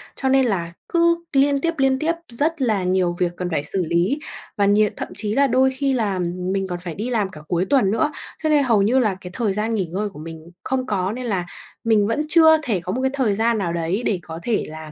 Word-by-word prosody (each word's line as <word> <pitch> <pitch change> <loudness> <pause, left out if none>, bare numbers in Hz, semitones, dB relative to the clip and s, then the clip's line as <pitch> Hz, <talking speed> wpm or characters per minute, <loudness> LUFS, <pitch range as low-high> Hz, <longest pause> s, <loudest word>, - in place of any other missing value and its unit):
cho 265 - -1
nên 265 0 +4
là 170 -7 -2 0.2
cứ 340 0 +2
liên 280 0 +3
tiếp, 335 +2 0
liên 270 -1 +2
tiếp 320 +2 +1 0.2
rất 295 +6 -1
là 215 -7 +1
nhiều 180 -1 +1
việc 175 -1 +1
cần 180 -1 -3
phải 155 -4 -1
xử 185 +5 -2
lý, 170 - +1 0.4
và 200 - +3
nhiều 205 +1 +4
thậm - - -4
chí 210 0 -2
là 280 +3 +3
đôi 260 +1 +3
khi 270 +1 -1
làm 200 -7 0 0.3
mình 195 -1 -1
còn 175 -1 -4
phải 175 -3 -7
đi 220 +5 -3
làm 215 -6 0
cả 155 - -11
cuối 175 +2 0
tuần 205 -4 +2
nữa. 300 +8 +1 0.3
Cho 310 - +1
nên 295 -2 +4
hầu 230 -6 +3
như 245 +6 +3
là 215 -6 +1
cái 180 - -9
thời 220 -5 0
gian 215 +3 -1
nghỉ 195 -4 0
ngơi 195 +5 -3
của 150 - -13
mình 165 +1 -10
không 260 -1 -1
có 195 -5 -1
nên 250 +3 -5
là 190 -6 -1 0.4
mình 220 -3 +3
vẫn 300 +7 -1
chưa 320 -1 +7
thể 225 -9 0
có 180 +2 -5
một 255 - -2
cái 265 0 +1
thời 250 -7 +1
gian 230 +2 +1
nào 175 -5 -2
đấy 170 +7 -1
để 200 -4 0
có 160 0 -8
thể 230 -3 0
là 155 0 -9
215 Hz, 260 wpm, -21 LUFS, 180-265 Hz, 0.4 s, chưa